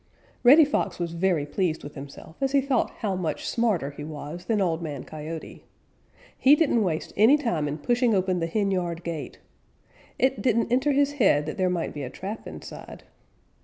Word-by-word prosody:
_ - - -38 0.4
Reddy 290 +6 +8
Fox 285 - -1
was 170 -1 -3
very 170 -3 +1
pleased 165 +1 -1
with 145 - -8
himself 140 +3 -10
as 270 0 0
he 280 - +5
thought 265 -2 +1
how 200 -4 0
much 175 -4 -3
smarter 210 - 0
he 145 +1 -9
was 155 +3 -7
than 225 -2 +1
Old 170 -4 0
Man 150 -4 -5
Coyote. 155 +1 -8 0.7
He 275 +3 +6
didn't 290 -7 +2
waste 165 -6 -2
any 225 +8 +6
time 175 - -1
in 145 +1 -3
pushing 240 - +2
open 185 -1 +1
the 165 - -1
henyard 180 -3 -1
gate. 165 -3 -5 0.8
It 265 +1 +1
didn't 235 -2 +1
enter 260 +4 +3
his 285 +1 +2
head 195 - +3
that 155 - -6
there 185 -1 +2
might 175 -2 -2
be 145 - -6
a 130 - -4
trap 200 - -7
inside. - - -10
185 Hz, 190 wpm, -26 LUFS, 160-240 Hz, 0.8 s, Reddy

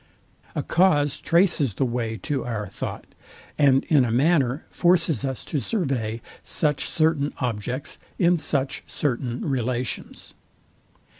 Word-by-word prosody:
A - - -1
cause 150 -5 +3
traces 165 - +3
the 135 - +1
way 120 -2 -2
to 140 -5 -1
our 110 -4 -3
thought, 95 - -6 0.5
and 135 -2 +5
in 145 -5 +4
a 120 - 0
manner 135 +2 +2
forces 170 - +2
us 135 -2 -3
to 150 - -1
survey 125 - -1 0.2
such 150 -3 0
certain 155 -3 +1
objects, 125 +2 -3 0.2
in 175 -1 +3
such 140 -3 -1
certain 125 -2 -2
relations. 125 -2 -3
135 Hz, 125 wpm, -24 LUFS, 120-155 Hz, 0.5 s, and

